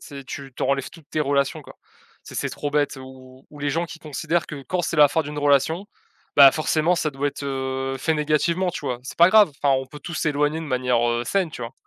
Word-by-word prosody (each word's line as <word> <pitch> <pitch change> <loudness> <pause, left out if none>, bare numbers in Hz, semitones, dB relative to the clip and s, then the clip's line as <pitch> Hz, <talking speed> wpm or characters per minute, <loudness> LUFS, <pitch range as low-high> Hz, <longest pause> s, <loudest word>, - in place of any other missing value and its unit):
c'est 140 -2 -10
tu 135 0 -8
tu - - -4
en - - -1
enlèves 140 -1 0
toutes 165 -4 -17
tes 155 - -1
relations, 140 -1 0
quoi. - - -14 0.5
C'est - - -11
c'est - - -2
trop 145 - -4
bête 145 -1 0
ou 130 0 -14
ou 145 - -13
les 145 0 -1
gens 165 +4 -1
qui 165 - -10
considèrent 160 +3 -2
que 140 -2 -8
quand 180 -1 0
c'est 170 - -2
la 145 -1 +7
fin 160 - 0
d'une 150 0 -6
relation, 145 +6 +2 0.5
bah, 140 -2 +9
forcément, 155 +2 +1
ça 155 - 0
doit 140 +1 -1
être, 140 - -8
heu, 135 0 -3
fait 160 +4 0
négativement, 155 +4 +1
tu - - -6
vois? 125 -1 -3
C'est 130 - -9
pas 170 +2 +7
grave, 210 -5 +6
enfin, 140 -1 +4
on 130 - -6
peut 145 +3 -12
tous 170 - -7
s'éloigner 150 +1 0
de - - -6
manière, 125 -2 +1
heu, 120 0 -1
saine, 190 -4 0
tu 125 - -8
vois? 115 - -6
145 Hz, 255 wpm, -23 LUFS, 135-160 Hz, 0.5 s, bah